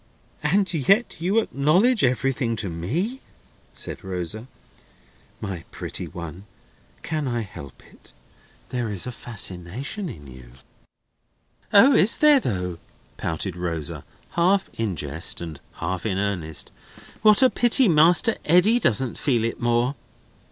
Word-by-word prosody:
"And 185 +4 +1
yet 195 - +2
you 190 +6 +1
acknowledge 195 - +3
everything 125 -2 +1
to 105 -3 -2
me!" 160 - -3 0.5
said - - -5
Rosa. 95 +5 -4 0.9
"My 95 -5 -5
pretty - - -6
one, 85 +1 -8 0.6
can 155 -3 -2
I 120 -2 -1
help 75 - -10
it? - - -19 0.6
There 120 -3 -2
is 100 -4 -2
a 125 - -4
fascination 115 - -3
in 75 - -10
you." 65 -2 -13 1.2
"O! 235 +8 +7
is 215 -1 +4
there 300 -2 +6
though?" 90 - -3 0.4
pouted 80 +3 -3
Rosa, 85 -4 -4 0.3
half 190 +3 +2
in 110 -5 -2
jest 75 +2 -2
and 80 -4 -7
half 90 +1 -4
in 95 -3 -1
earnest. 90 -6 -3 0.5
"What 215 +3 +6
a 255 - +5
pity 245 +1 +3
Master 175 +7 +4
Eddy 180 +9 +4
doesn't 130 - +1
feel 120 -6 +1
it 115 - -3
more!" 120 +2 +1
120 Hz, 130 wpm, -23 LUFS, -, 1.2 s, O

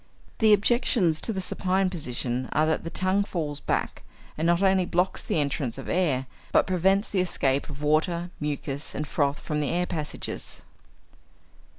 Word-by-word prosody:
The 220 -1 +5
objections 205 -5 +3
to - - +1
the 190 -3 -2
supine 185 0 0
position 125 -6 -2
are 155 - +3
that 160 0 0
the 165 - -4
tongue 185 +3 +1
falls 155 -7 -3
back, - - -2 0.3
and 160 +2 0
not 175 +2 +3
only 190 -1 +4
blocks 180 +1 0
the - - -2
entrance 140 -4 -1
of 135 - -7
air, 150 -8 +1 0.3
but - - +4
prevents 190 +3 +2
the 195 - -1
escape 140 -7 +1
of 145 0 -7
water, 170 +3 +1
mucus, 145 -1 -3
and 150 +1 -3
froth 145 -1 0
from 150 -2 -3
the 145 - 0
air 175 +1 +1
passages. 155 -4 -5
165 Hz, 170 wpm, -26 LUFS, 145-185 Hz, 0.3 s, The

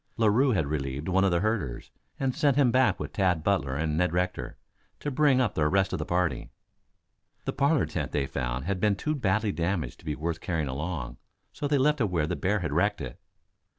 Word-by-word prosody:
Larue 115 +4 +4
had 80 -7 +1
relieved 70 0 -3
one 95 +1 +3
of 100 - +4
the 85 -1 +1
herders 105 - -2 0.3
and 135 -1 0
sent 145 -3 +2
him 135 -4 +4
back 120 -6 +3
with - - -5
Tad 90 -5 +1
Butler 80 -9 +1
and 75 +1 -1
Ned 90 0 +1
Rector, 90 +1 -2 0.4
to 145 - -3
bring 140 -1 +4
up 120 -6 +1
the 75 -1 +2
rest 95 +3 +2
of - - -1
the - - -4
party. 90 -1 0 1.0
The - - -2
parlor 145 +2 +2
tent - - -4
they 70 -2 0
found 65 -1 -3
had 100 0 -1
been 105 +1 +2
too 150 +10 -2
badly 110 -5 +1
damaged 85 -1 -2
to - - -18
be 75 -2 -2
worth 80 +2 -3
carrying 80 -4 -1
along, 70 -2 -4 0.4
so 145 - -3
they 145 0 +2
left 150 +1 +2
it 110 - +2
where 85 -4 +1
the - - -2
bear 100 +2 0
had 75 -4 -2
wrecked 100 +6 +1
it. 65 -2 -7
95 Hz, 220 wpm, -28 LUFS, 80-115 Hz, 1.0 s, Larue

